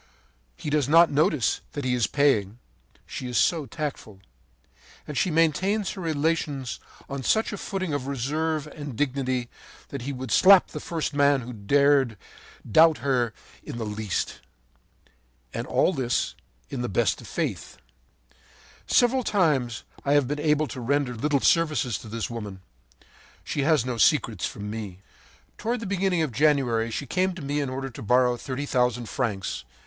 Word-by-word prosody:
He 150 Hz, -, -5 dB
does 145 Hz, -3 st, +1 dB
not 165 Hz, +2 st, +6 dB
notice 150 Hz, -, +2 dB
that 145 Hz, -2 st, -4 dB
he 125 Hz, -, +1 dB
is 120 Hz, -4 st, +2 dB
paying, 115 Hz, -8 st, +2 dB, 0.5 s
she 130 Hz, -, -6 dB
is 125 Hz, -, -2 dB
so 160 Hz, -5 st, +2 dB
tactful; 145 Hz, -11 st, -6 dB, 0.9 s
and 150 Hz, -, -6 dB
she 180 Hz, -, +1 dB
maintains 175 Hz, +6 st, +1 dB
her 195 Hz, -, -7 dB
relations 150 Hz, -4 st, -1 dB, 0.3 s
on 140 Hz, -1 st, -5 dB
such 220 Hz, -, +1 dB
a -, -, -4 dB
footing 185 Hz, -5 st, -3 dB
of 140 Hz, -2 st, -2 dB
reserve 150 Hz, +4 st, -1 dB
and 145 Hz, -4 st, -8 dB
dignity 130 Hz, -2 st, -1 dB, 0.4 s
that 140 Hz, -, -5 dB
he 135 Hz, +4 st, -4 dB
would 130 Hz, -3 st, -6 dB
slap 190 Hz, -, +7 dB
the -, -, -6 dB
first 160 Hz, -3 st, -3 dB
man 140 Hz, -1 st, +3 dB
who 125 Hz, +1 st, -7 dB
dared 135 Hz, +2 st, +3 dB, 0.5 s
doubt 160 Hz, +7 st, +6 dB
her 125 Hz, -4 st, +1 dB, 0.3 s
in -, -, -7 dB
the 115 Hz, -, -3 dB
least. 105 Hz, -2 st, -3 dB, 1.1 s
And -, -, -4 dB
all 190 Hz, -, +2 dB
this 130 Hz, -5 st, -1 dB, 0.4 s
in -, -, -3 dB
the 120 Hz, -, -2 dB
best 95 Hz, -, +1 dB
of -, -, -11 dB
faith. -, -, -4 dB, 1.1 s
“Several 255 Hz, +1 st, +3 dB
times 145 Hz, -, +1 dB, 0.2 s
I 140 Hz, -, +2 dB
have 145 Hz, -3 st, +3 dB
been 145 Hz, +2 st, -2 dB
able 150 Hz, 0 st, +2 dB
to 125 Hz, -, -6 dB
render 135 Hz, +1 st, 0 dB
little 140 Hz, +4 st, 0 dB
services 150 Hz, -, +2 dB
to -, -, -11 dB
this 115 Hz, +1 st, -3 dB
woman. 105 Hz, -5 st, -7 dB, 0.8 s
She 145 Hz, -, -2 dB
has 145 Hz, -3 st, +3 dB
no 125 Hz, -2 st, -3 dB
secrets 115 Hz, -, +2 dB
from 105 Hz, 0 st, -7 dB
me. 105 Hz, -4 st, -6 dB, 0.6 s
“Toward 235 Hz, +2 st, -1 dB
the 225 Hz, -, -6 dB
beginning 190 Hz, -3 st, +1 dB
of 150 Hz, -, -2 dB
January 125 Hz, -5 st, +2 dB
she 115 Hz, -, -4 dB
came 185 Hz, +6 st, 0 dB
to 170 Hz, -, -8 dB
me 145 Hz, +1 st, -1 dB
in 140 Hz, -2 st, -1 dB
order 135 Hz, +1 st, -4 dB
to -, -, -10 dB
borrow 125 Hz, +3 st, +3 dB
thirty 135 Hz, +3 st, -4 dB
thousand 125 Hz, -3 st, 0 dB
francs. 105 Hz, -, -2 dB
140 Hz, 165 wpm, -26 LUFS, 120-155 Hz, 1.1 s, slap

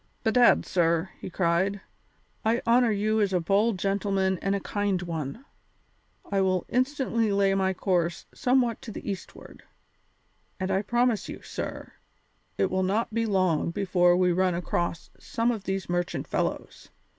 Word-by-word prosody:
"Bedad, 240 Hz, +1 st, +4 dB
sir," 170 Hz, 0 st, +1 dB
he -, -, -7 dB
cried, 185 Hz, +3 st, +1 dB, 0.6 s
"I 230 Hz, +2 st, +1 dB
honour 235 Hz, +1 st, +4 dB
you 215 Hz, +1 st, +1 dB
as 200 Hz, -2 st, +1 dB
a 180 Hz, -, +3 dB
bold 200 Hz, +5 st, +2 dB
gentleman 195 Hz, -1 st, 0 dB
and 195 Hz, 0 st, 0 dB
a -, -, -1 dB
kind 205 Hz, -1 st, -1 dB
one. 165 Hz, -, -5 dB, 0.9 s
I 195 Hz, -1 st, +2 dB
will 185 Hz, -2 st, +1 dB
instantly 250 Hz, -4 st, 0 dB
lay 200 Hz, -1 st, +3 dB
my 190 Hz, -1 st, +1 dB
course 175 Hz, -3 st, 0 dB
somewhat 250 Hz, -3 st, +1 dB
to 225 Hz, -, -8 dB
the -, -, -8 dB
eastward, 195 Hz, -2 st, -7 dB, 1.0 s
and 190 Hz, 0 st, -2 dB
I 190 Hz, 0 st, +2 dB
promise 240 Hz, +1 st, 0 dB
you, -, -, -8 dB
sir, -, -, -6 dB, 0.6 s
it 190 Hz, -, +1 dB
will 185 Hz, 0 st, +1 dB
not 210 Hz, +4 st, 0 dB
be 230 Hz, 0 st, 0 dB
long 185 Hz, -6 st, +1 dB
before 180 Hz, -1 st, +2 dB
we 180 Hz, -1 st, +3 dB
run 180 Hz, 0 st, +1 dB
across 175 Hz, -1 st, -2 dB
some 230 Hz, +1 st, 0 dB
of 215 Hz, -5 st, -5 dB
these 195 Hz, 0 st, -2 dB
merchant 175 Hz, 0 st, -2 dB
fellows. -, -, -3 dB
195 Hz, 155 wpm, -27 LUFS, 180-220 Hz, 1.0 s, Bedad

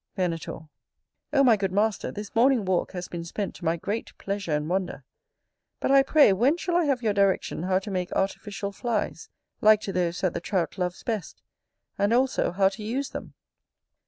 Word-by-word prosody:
Venator. 170 Hz, -4 st, -2 dB, 0.7 s
O 275 Hz, -2 st, +4 dB
my 240 Hz, -4 st, +6 dB
good 195 Hz, -2 st, -2 dB
master, 205 Hz, +2 st, 0 dB
this 210 Hz, -1 st, -7 dB
morning 240 Hz, -1 st, +4 dB
walk 185 Hz, 0 st, 0 dB
has 180 Hz, -1 st, -5 dB
been 170 Hz, -1 st, -6 dB
spent 195 Hz, +4 st, -4 dB
to 175 Hz, -, -10 dB
my 165 Hz, +1 st, +1 dB
great 205 Hz, +6 st, -4 dB
pleasure 200 Hz, -3 st, -4 dB
and 150 Hz, 0 st, 0 dB
wonder: 185 Hz, +1 st, -2 dB, 0.8 s
but, -, -, 0 dB
I 275 Hz, 0 st, +7 dB
pray, 285 Hz, -5 st, +5 dB
when 255 Hz, -, +3 dB
shall 350 Hz, 0 st, -2 dB
I 350 Hz, -1 st, +3 dB
have 265 Hz, -4 st, 0 dB
your 215 Hz, -2 st, +2 dB
direction 200 Hz, -4 st, +1 dB
how 185 Hz, +1 st, +1 dB
to 195 Hz, +2 st, -4 dB
make 180 Hz, -1 st, -2 dB
artificial 200 Hz, +1 st, -2 dB
flies, 225 Hz, +1 st, -3 dB, 0.3 s
like 215 Hz, 0 st, +6 dB
to 195 Hz, -, -4 dB
those 175 Hz, -1 st, -1 dB
that 185 Hz, -3 st, +1 dB
the 170 Hz, -, -3 dB
Trout 185 Hz, 0 st, -2 dB
loves 180 Hz, -1 st, -2 dB
best; 220 Hz, -6 st, -4 dB, 0.6 s
and, 205 Hz, +3 st, +2 dB
also, 260 Hz, +2 st, +2 dB
how 190 Hz, +2 st, +3 dB
to 200 Hz, +2 st, -9 dB
use 260 Hz, +6 st, -2 dB
them? -, -, -8 dB
200 Hz, 190 wpm, -26 LUFS, 180-230 Hz, 0.8 s, I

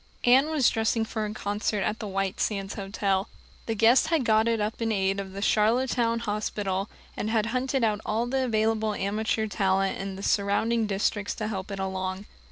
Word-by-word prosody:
Anne 265 Hz, +5 st, +5 dB
was 300 Hz, -6 st, +3 dB
dressing 225 Hz, 0 st, +1 dB
for 220 Hz, -1 st, -3 dB
a -, -, -5 dB
concert 205 Hz, 0 st, -1 dB
at 215 Hz, +3 st, -1 dB
the 215 Hz, -, -5 dB
White 195 Hz, -1 st, -2 dB
Sands 195 Hz, -2 st, -1 dB
Hotel. 195 Hz, 0 st, -1 dB, 0.4 s
The 225 Hz, -, -1 dB
guests 230 Hz, +6 st, +5 dB
had 320 Hz, -5 st, +1 dB
got 220 Hz, 0 st, +3 dB
it 230 Hz, -1 st, +1 dB
up 210 Hz, +3 st, -2 dB
in 225 Hz, -1 st, 0 dB
aid 195 Hz, -1 st, +1 dB
of 190 Hz, -1 st, -6 dB
the 200 Hz, +1 st, -4 dB
Charlottetown 230 Hz, +2 st, +2 dB
hospital, 205 Hz, -2 st, -2 dB, 0.3 s
and 215 Hz, -, -3 dB
had 220 Hz, -1 st, +1 dB
hunted 260 Hz, 0 st, 0 dB
out 215 Hz, -2 st, +1 dB
all 225 Hz, +2 st, 0 dB
the 260 Hz, +1 st, 0 dB
available 220 Hz, -2 st, +1 dB
amateur 215 Hz, +3 st, -1 dB
talent 195 Hz, -2 st, 0 dB
in 195 Hz, 0 st, -4 dB
the 195 Hz, -, -8 dB
surrounding 215 Hz, +3 st, +1 dB
districts 205 Hz, +1 st, -1 dB
to 215 Hz, -, -3 dB
help 190 Hz, -2 st, -4 dB
it 200 Hz, -, -5 dB
along. 190 Hz, 0 st, -3 dB
215 Hz, 190 wpm, -27 LUFS, 195-230 Hz, 0.4 s, Anne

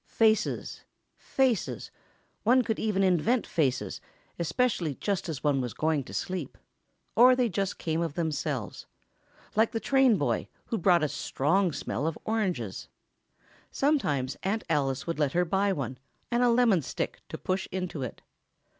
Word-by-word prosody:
Faces... 220 Hz, -1 st, +1 dB, 0.3 s
faces—one 250 Hz, 0 st, -1 dB
could 225 Hz, -2 st, -2 dB
even 205 Hz, -3 st, +1 dB
invent 190 Hz, +7 st, +2 dB
faces, 140 Hz, -7 st, -1 dB, 0.4 s
especially 170 Hz, -, 0 dB
just 200 Hz, +1 st, -2 dB
as 150 Hz, -5 st, -5 dB
one 145 Hz, -3 st, +2 dB
was 120 Hz, -3 st, -4 dB
going 155 Hz, -2 st, +1 dB
to -, -, -10 dB
sleep... 185 Hz, 0 st, -4 dB, 0.6 s
or 250 Hz, +2 st, +7 dB
they 250 Hz, -1 st, +2 dB
just 195 Hz, -2 st, -2 dB
came 160 Hz, 0 st, -1 dB
of 165 Hz, -3 st, -2 dB
themselves... 150 Hz, -8 st, -3 dB, 0.7 s
like 220 Hz, +1 st, +3 dB
the 225 Hz, -, 0 dB
train 265 Hz, -3 st, +4 dB
boy, -, -, 0 dB, 0.2 s
who 230 Hz, -, -2 dB
brought 175 Hz, -2 st, +4 dB
a -, -, +3 dB
strong 170 Hz, +7 st, +1 dB
smell 145 Hz, 0 st, -3 dB
of 165 Hz, -, -2 dB
oranges. 180 Hz, -, -2 dB, 0.8 s
Sometimes 150 Hz, -, +1 dB
Aunt 210 Hz, +4 st, -1 dB
Alice 135 Hz, -3 st, 0 dB
would 165 Hz, -2 st, -3 dB
let 145 Hz, -3 st, +1 dB
her 180 Hz, +1 st, +2 dB
buy 195 Hz, +3 st, +1 dB
one, 130 Hz, -7 st, -3 dB, 0.3 s
and 240 Hz, +1 st, +2 dB
a 245 Hz, -, +5 dB
lemon 230 Hz, -7 st, +4 dB
stick -, -, -4 dB
to -, -, -5 dB
push 185 Hz, +1 st, -2 dB
into 180 Hz, -5 st, -3 dB
it. 125 Hz, -4 st, -6 dB
180 Hz, 150 wpm, -28 LUFS, 150-225 Hz, 0.8 s, or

